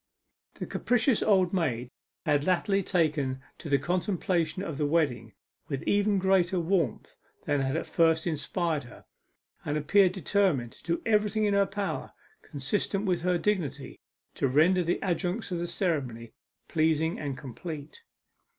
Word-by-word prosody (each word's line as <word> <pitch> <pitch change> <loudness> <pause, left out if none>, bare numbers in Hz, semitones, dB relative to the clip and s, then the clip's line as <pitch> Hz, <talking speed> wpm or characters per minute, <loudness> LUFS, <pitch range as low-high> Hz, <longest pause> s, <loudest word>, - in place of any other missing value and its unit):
The - - -5
capricious 245 -1 +1
old 190 -4 +3
maid 125 -9 -1 0.3
had 145 -3 +2
latterly 195 +2 +2
taken 150 -8 0 0.2
to 155 - -7
the 140 - +4
contemplation 175 +1 -1
of 160 -7 -5
the 150 - +1
wedding 125 - 0 0.3
with 135 -3 -4
even 205 0 +2
greater 190 -1 +2
warmth 170 - -1 0.3
than 145 -1 +1
had 135 +3 0
at - - -3
first 160 -1 +2
inspired 160 -2 -1
her, 120 - -14 0.6
and 145 +1 -1
appeared 180 +5 +4
determined 180 - +1
to - - -18
do - - -10
everything 215 0 +2
in 205 - +2
her 200 0 +3
power, 195 0 -4 0.3
consistent 195 +7 -2
with 180 -3 +1
her 180 0 +2
dignity, 155 -9 -2 0.3
to - - 0
render 165 +7 +4
the 170 +1 0
adjuncts 185 +3 -1
of 175 - -1
the 175 - -2
ceremony 140 - -2 0.3
pleasing 160 0 +1
and 140 -3 -4
complete. 145 - -8
170 Hz, 150 wpm, -28 LUFS, 145-190 Hz, 0.6 s, the